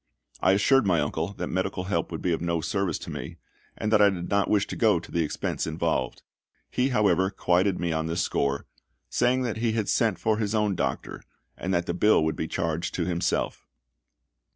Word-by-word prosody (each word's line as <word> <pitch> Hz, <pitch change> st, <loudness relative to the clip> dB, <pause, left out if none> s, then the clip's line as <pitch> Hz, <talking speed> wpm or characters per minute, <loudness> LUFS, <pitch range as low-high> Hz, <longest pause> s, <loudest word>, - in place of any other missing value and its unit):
I 95 Hz, -, +4 dB
assured 115 Hz, +4 st, +4 dB
my 85 Hz, -4 st, +3 dB
uncle 80 Hz, +5 st, -2 dB
that -, -, -4 dB
medical 95 Hz, 0 st, -2 dB
help 100 Hz, 0 st, -2 dB
would 80 Hz, -, -5 dB
be 90 Hz, -, +1 dB
of 80 Hz, -, -2 dB
no 85 Hz, -1 st, 0 dB
service 95 Hz, 0 st, -1 dB
to -, -, -8 dB
me, -, -, -6 dB, 0.4 s
and 105 Hz, +1 st, -1 dB
that 105 Hz, -, +6 dB
I 100 Hz, -, +7 dB
did 90 Hz, -3 st, -4 dB
not 100 Hz, -1 st, +2 dB
wish 100 Hz, -1 st, +3 dB
to -, -, -6 dB
go -, -, +3 dB
to -, -, -13 dB
the 85 Hz, -, +1 dB
expense 75 Hz, -, -3 dB
involved. 80 Hz, -5 st, -1 dB, 0.5 s
He, 125 Hz, +2 st, +1 dB
however, 95 Hz, -6 st, +3 dB
quieted 95 Hz, 0 st, +1 dB
me 85 Hz, -1 st, -1 dB
on 80 Hz, 0 st, -1 dB
this 80 Hz, +1 st, 0 dB
score, 70 Hz, 0 st, -1 dB, 0.5 s
saying 130 Hz, +1 st, +2 dB
that 115 Hz, -3 st, -2 dB
he 115 Hz, 0 st, 0 dB
had 110 Hz, -3 st, -1 dB
sent 110 Hz, -5 st, +2 dB
for 110 Hz, -1 st, 0 dB
his 105 Hz, 0 st, -1 dB
own 105 Hz, -2 st, +2 dB
doctor, 70 Hz, -7 st, -3 dB, 0.3 s
and 90 Hz, -, -4 dB
that 85 Hz, 0 st, 0 dB
the 85 Hz, -, -2 dB
bill 90 Hz, -2 st, +4 dB
would 80 Hz, -, 0 dB
be 80 Hz, -, -3 dB
charged 85 Hz, 0 st, -2 dB
to 85 Hz, -, -1 dB
himself. 85 Hz, -1 st, -1 dB
95 Hz, 210 wpm, -26 LUFS, 85-105 Hz, 0.5 s, I